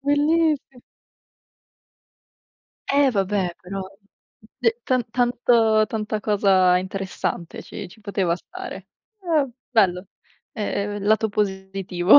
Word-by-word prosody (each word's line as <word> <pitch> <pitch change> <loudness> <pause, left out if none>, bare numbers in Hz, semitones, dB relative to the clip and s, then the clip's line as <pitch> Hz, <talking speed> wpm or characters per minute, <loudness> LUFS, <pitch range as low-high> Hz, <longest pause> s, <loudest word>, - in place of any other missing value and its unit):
bellissi 290 -1 +1 2.1
Eh, 280 -1 +5
vabbè 195 -4 0
però, 195 +2 -5 0.8
d 245 - +3 0.2
tan 255 -1 +2
tan 245 +1 +2 0.6
tanta 215 0 -3
cosa 195 -4 +4
interessante, 185 -2 -4
ci 195 - -8
ci 200 - -17
poteva 195 -4 0
stare. 370 - -9 0.3
Eh, 320 -7 +1 0.2
bello, 190 -5 +3 0.5
ehm, 205 -1 -2
lato 220 +1 +3
positivo. 190 0 +3
205 Hz, 95 wpm, -23 LUFS, 190-255 Hz, 2.1 s, Eh